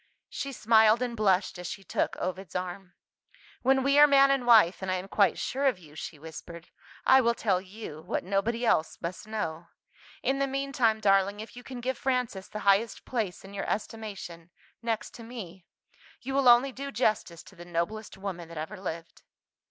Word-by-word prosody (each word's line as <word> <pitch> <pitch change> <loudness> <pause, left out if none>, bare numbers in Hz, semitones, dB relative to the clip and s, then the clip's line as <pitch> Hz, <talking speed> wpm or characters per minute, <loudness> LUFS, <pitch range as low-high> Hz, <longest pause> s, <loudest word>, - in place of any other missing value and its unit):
She 275 - -4
smiled 220 -1 +4
and 240 -1 -3
blushed 195 -4 +1
as 180 - -5
she 195 - -6
took - - -1
Ovid's 185 -1 -5
arm. 180 +1 -5 0.7
"When 265 +1 +3
we 280 +2 +4
are 295 - +9
man 275 -1 +6
and 265 -3 0
wife, 215 -7 +6
and 190 - -3
I 185 - +1
am 185 +1 -5
quite 200 0 +3
sure 275 +2 -1
of 255 -7 +2
you," 155 -5 -16
she 155 0 -7
whispered, 160 +2 -10 0.4
"I 265 0 +7
will 235 -1 +2
tell 190 -6 +1
you, 190 -5 -9
what - - -3
nobody 215 +6 0
else 160 -8 +2
must 175 +5 -6
know. 170 -6 -4 0.6
In 275 +1 +1
the 275 - +1
meantime, 265 -5 0
darling, 195 0 +3
if 220 +3 -9
you 245 - -9
can 250 -1 -8
give 260 +2 -2
Frances 250 -7 -1
the 215 - -6
highest 200 +3 +2
place 215 -7 -3
in 195 - -11
your 195 - -4
estimation 200 -6 -5 0.3
next 230 -2 -3
to 235 - -10
me 195 -7 -9 0.5
you 265 +2 -5
will 270 -2 +5
only 245 +3 +6
do 275 +2 -6
justice 210 -8 0
to 195 - -16
the 175 - -10
noblest 175 +6 -3
woman 190 -4 -5
that 170 - -9
ever 185 +6 -5
lived." 165 -3 -7
210 Hz, 190 wpm, -28 LUFS, 180-245 Hz, 0.7 s, are